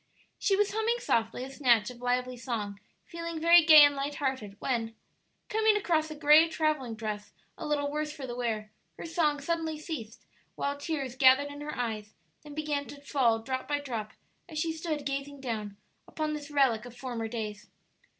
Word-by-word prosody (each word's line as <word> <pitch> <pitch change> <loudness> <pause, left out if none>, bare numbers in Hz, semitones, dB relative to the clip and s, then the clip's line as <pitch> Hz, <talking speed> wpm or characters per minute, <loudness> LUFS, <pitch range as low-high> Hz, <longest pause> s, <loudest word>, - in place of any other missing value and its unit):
She 395 - +2
was 415 +1 +2
humming 445 +3 +1
softly 235 - 0
a 265 - -7
snatch 245 -6 +3
of 245 -1 -13
lively 250 0 0
song, 225 -5 -4 0.3
feeling 335 -1 -5
very 335 +1 +7
gay 310 -2 +10
and 290 0 +5
light 280 +1 -3
hearted, 260 -8 -3
when, 225 -2 -2 0.5
coming 435 0 +3
across 320 -6 +1
a 310 - -6
gray 300 +2 +6
travelling 305 -7 -1
dress 215 -2 -5 0.2
a - - -6
little 285 -1 0
worse 300 0 -2
for 295 -3 -7
the 240 -2 -5
wear, 220 -3 -2 0.3
her - - -7
song 315 -3 +1
suddenly 320 +1 -2
ceased, 290 -8 -7 0.3
while 280 0 -1
tears 285 -4 -4
gathered 265 +2 +5
in 290 0 -9
her 300 +1 -5
eyes, 220 -3 -4 0.3
then 295 -1 -11
began 295 -2 -2
to 285 - -10
fall 240 -6 +1
drop 260 +1 -3
by 290 -1 0
drop 230 -7 -5 0.4
as 315 - -7
she 320 +1 0
stood 315 -3 -4
gazing 275 +1 -3
down, 215 -6 -4 0.3
upon 310 -1 -2
this 295 -1 -6
relic 265 -6 +2
of 245 0 -11
former 240 -4 -4
days. 215 -2 -5
280 Hz, 185 wpm, -29 LUFS, 235-310 Hz, 0.5 s, gay